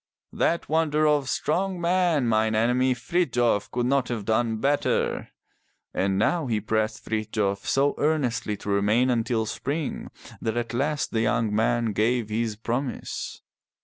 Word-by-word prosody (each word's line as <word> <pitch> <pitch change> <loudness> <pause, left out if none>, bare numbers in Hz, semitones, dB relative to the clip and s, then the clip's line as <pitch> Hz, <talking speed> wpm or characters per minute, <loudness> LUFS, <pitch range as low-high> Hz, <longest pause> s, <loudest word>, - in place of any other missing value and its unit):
"That 170 - 0
wonder 155 -1 +2
of 145 -3 +2
strong 185 +7 -1
men, 170 -5 +2
mine 110 -1 +2
enemy, 125 +3 +2
Frithjof, 120 - +1
could 120 0 -1
not 135 0 +2
have 115 -4 -4
done 110 +1 +1
better!" 140 +5 0 0.6
And 95 0 0
now 140 - +1
he 110 -3 0
pressed 110 +1 -1
Frithjof 105 -2 -2
so 140 +1 +2
earnestly 135 -8 0
to 100 - -7
remain 105 +6 +3
until 115 -1 0
spring 145 +7 -3 0.3
that 110 +1 -2
at 120 0 -2
last 145 +3 -1
the 110 - 0
young 110 -1 +1
man 115 +1 +1
gave 115 +1 +1
his 110 0 -1
promise. 120 +4 -4
120 Hz, 145 wpm, -25 LUFS, 110-145 Hz, 0.6 s, remain